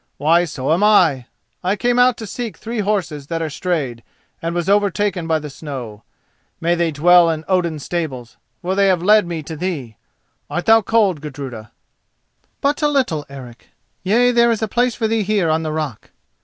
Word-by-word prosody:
Why, 165 +4 +3
so 145 -2 -1
am 180 +5 +1
I. 165 - +4 0.4
I 185 +3 +1
came 245 +4 +1
out 245 -1 +4
to 220 - -7
seek 220 -3 -6
three 230 0 -5
horses 190 -9 -2
that 165 +1 -3
are 160 -2 -3
strayed, 140 -9 -2 0.4
and 165 +1 -3
was 175 -1 -2
overtaken 200 -3 +1
by 160 -1 +2
the 155 -1 -6
snow. 130 -8 -7 0.6
May 170 +1 +1
they 170 -1 +1
dwell 170 +3 +5
in 160 -1 -3
Odin's 170 -6 0
stables, 135 -9 -4 0.3
for 185 +2 -1
they 200 0 +3
have 180 -3 +2
led 210 -1 +5
me 165 -2 -4
to 160 +2 -7
thee. 145 - -4 0.5
Art 175 - -3
thou 225 0 +6
cold, 200 -7 +1
Gudruda?" 135 -7 -7 0.9
"But 285 +2 0
a 300 - +3
little, 255 - 0
Eric. 125 -4 -12 0.3
Yea, 235 +6 +3
there 235 -1 +4
is 225 -1 0
place 245 0 +1
for 225 - -1
thee 225 0 0
here 200 -5 +1
on 160 +1 +1
the 155 -1 -3
rock." 155 -7 -4
175 Hz, 185 wpm, -19 LUFS, 150-210 Hz, 0.9 s, thou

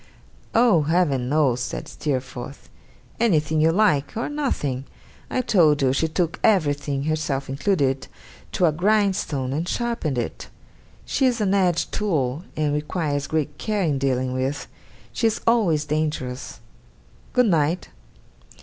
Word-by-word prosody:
'Oh, 225 -8 +5
Heaven 145 -5 +1
knows,' 140 -5 +2
said 125 -1 -4
Steerforth. 130 -2 -5 0.5
'Anything 155 -8 +2
you 160 +1 +4
like 175 -5 +2
or 230 - -2
nothing! 145 - -2 0.4
I 255 - 0
told 155 - +3
you 130 -1 +3
she 160 +4 +1
took 165 +1 -1
everything, 145 -8 +2
herself 150 -3 -1
included, 135 -2 0 0.5
to 180 - +2
a 160 - +4
grindstone, 180 -7 +1
and 160 +5 -2
sharpened 230 - -2
it. 120 - -4 0.6
She 265 - +2
is 245 -2 0
an 200 -2 +1
edge 180 -4 +1
tool, 155 -9 -1 0.2
and 150 -1 +1
requires 150 -1 -2
great 150 -2 -2
care 210 -2 -1
in 145 -5 0
dealing 130 -1 0
with. 130 +3 -2 0.5
She 230 - +2
is 220 - -1
always 190 -11 +3
dangerous. 150 -7 -3 0.7
Good 250 0 +4
night! 165 -3 +1
155 Hz, 135 wpm, -23 LUFS, 140-190 Hz, 0.7 s, Oh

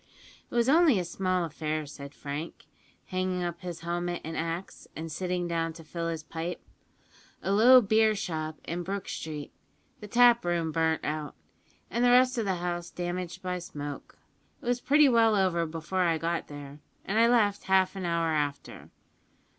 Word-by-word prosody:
"It - - -8
was 235 0 +3
only 310 - +5
a 180 - -1
small 185 0 0
affair," 155 0 -3
said 140 0 -10
Frank, 145 +3 -6 0.4
hanging 185 -1 -2
up 175 0 -4
his 175 -2 -6
helmet 175 +1 -2
and 160 +1 -5
axe, 165 +3 -4
and 160 0 -6
sitting 180 +1 -2
down 165 -1 -1
to 165 0 -12
fill 165 +1 -4
his 165 -2 -3
pipe; 165 +2 -5 0.8
"a 190 - 0
low 245 +5 +8
beer 220 0 +3
shop 155 -5 -4
in 170 +2 -4
Brook 195 +2 -4
Street; 150 -2 -6 0.5
the 210 - -9
taproom 200 -9 +4
burnt 160 0 0
out, 150 0 -3 0.6
and 235 - 0
the 245 - +5
rest 255 0 +5
of 225 - -1
the 190 -2 0
house 175 0 -3
damaged 175 0 -5
by 180 0 -2
smoke. 145 -4 -7 0.4
It - - -15
was 245 0 0
pretty 295 +1 +5
well 230 -3 +4
over 180 -4 +1
before 165 +4 -3
I 170 -2 +2
got 165 +1 -2
there, 145 0 -9 0.3
and 210 +3 +1
I 230 - +6
left 210 -4 +2
half 190 0 +3
an 190 - -5
hour 170 -1 0
after. 145 -2 -3
175 Hz, 175 wpm, -28 LUFS, 160-200 Hz, 0.8 s, low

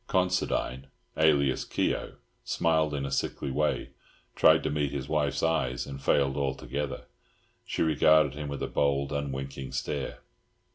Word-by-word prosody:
Considine, 90 -8 0 0.3
alias 70 -4 +3
Keogh, - - -2 0.3
smiled 80 -2 +1
in 70 -1 -2
a 70 - -4
sickly 70 0 -2
way, 75 +3 0 0.4
tried - - +5
to - - -1
meet 75 -2 0
his 70 -2 -4
wife's 75 -2 0
eyes, 70 -7 0
and 70 -1 -8
failed 70 0 +2
altogether. 70 0 -3 0.6
She - - 0
regarded 80 0 +4
him 75 0 -5
with 70 -1 -4
a - - -1
bold, 70 -1 0
unwinking 70 -2 -4
stare. 70 -2 -3
70 Hz, 140 wpm, -28 LUFS, 70-75 Hz, 0.6 s, tried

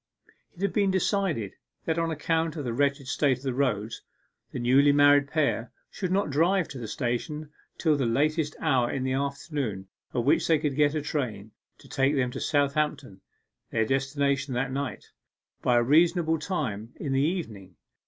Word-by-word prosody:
It 180 - -7
had 200 - 0
been 200 -2 +2
decided 190 - 0 0.3
that 160 0 0
on 165 0 0
account 160 +1 -1
of 150 - -4
the 120 - -2
wretched 140 +1 0
state 140 -2 +1
of 125 - -17
the 130 -2 -1
roads, 115 -5 -1 0.5
the - - -5
newly 130 +4 +4
married 145 0 +5
pair 140 -6 0 0.2
should 185 -3 -4
not 190 -5 +1
drive 170 +5 +2
to 135 - -7
the 115 - -5
station 150 +5 -3 0.3
till 155 -3 +2
the 135 -4 0
latest 150 +5 0
hour 125 -2 +2
in 130 - -2
the 130 0 -1
afternoon 140 - -3 0.2
at 120 - -1
which 140 - +2
they 160 - +4
could 150 -2 -2
get 145 +1 +3
a 150 - -1
train 110 -9 -3 0.3
to - - -17
take 135 +2 +1
them 125 -2 0
to - - -6
Southampton 145 -7 0 0.5
(their 110 -1 +1
destination 135 +1 0
that 125 +1 -1
night) 140 -1 -4 0.6
by 125 -1 +3
a 120 - +4
reasonable 160 +3 +3
time 120 - -3
in 140 -3 -3
the 135 - +2
evening. 115 - -3
140 Hz, 180 wpm, -27 LUFS, 125-155 Hz, 0.6 s, married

